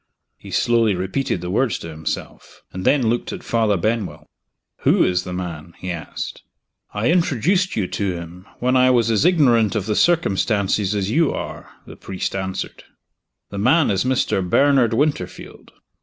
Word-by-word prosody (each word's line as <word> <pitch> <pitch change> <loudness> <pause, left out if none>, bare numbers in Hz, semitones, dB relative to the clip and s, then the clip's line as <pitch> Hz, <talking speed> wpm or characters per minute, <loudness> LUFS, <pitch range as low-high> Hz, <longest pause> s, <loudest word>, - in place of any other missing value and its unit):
He - - -13
slowly 115 -4 +2
repeated 95 +4 -2
the 90 0 -4
words 115 0 +1
to 85 - -8
himself 80 0 -6
and 95 0 -5
then 140 -4 +3
looked 120 +2 0
at - - -7
Father 110 -3 +1
Benwell. 110 +2 -2 0.5
"Who - - +3
is 90 0 0
the 90 - -6
man?" 85 -2 -6
he 90 - -5
asked. 85 -2 -6 0.5
"I 110 +9 0
introduced 175 - +1
you 105 - 0
to 100 -3 -1
him, 85 +2 -9
when 125 +1 +1
I 130 0 +5
was 120 -3 +3
as 110 +7 +2
ignorant 125 - +4
of 105 -3 -1
the 105 -1 -1
circumstances 105 - +1
as 100 0 -1
you 160 +3 +3
are," - - -6 0.2
the - - -12
priest 95 0 -4
answered. 95 -1 -4 0.7
"The 100 - -5
man 130 +6 +3
is 95 -2 +1
Mr. 130 -6 +1
Bernard 125 +4 +3
Winterfield." 145 +4 -3
110 Hz, 165 wpm, -21 LUFS, 95-130 Hz, 0.7 s, I